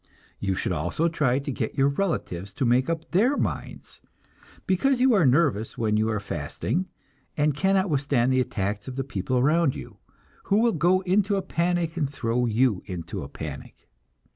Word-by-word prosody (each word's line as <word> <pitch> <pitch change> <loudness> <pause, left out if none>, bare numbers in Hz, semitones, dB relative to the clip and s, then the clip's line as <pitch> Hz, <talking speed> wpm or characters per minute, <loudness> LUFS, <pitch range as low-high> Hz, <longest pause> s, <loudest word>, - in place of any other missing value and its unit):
You 95 -2 -1
should - - -2
also 90 - 0
try 145 -6 +1
to 140 +1 -3
get - - -4
your 135 0 +4
relatives 120 - -2
to 140 - -1
make 125 +3 +2
up 165 -1 -3
their 235 +11 +3
minds, - - -4 0.6
because 245 +8 +2
you 255 0 +4
are 185 -9 +4
nervous 130 -6 +1
when 110 -2 +1
you 110 +1 +1
are 105 -1 -1
fasting, 100 - -3 0.5
and 150 0 +2
cannot 190 +4 +2
withstand 135 -5 +1
the 130 - +3
attacks 105 -3 -3
of 130 - -6
the 135 - -2
people 125 -1 -2
around 150 +3 +3
you, - - -9 0.5
who 200 - +2
will 230 +1 +3
go 180 +3 +3
into 195 +2 +1
a 195 - -1
panic 175 -2 -1
and 145 -5 0
throw 125 -3 -1
you 115 -3 +2
into 90 -4 -5
a - - -7
panic. - - -9
140 Hz, 180 wpm, -25 LUFS, 115-175 Hz, 0.6 s, your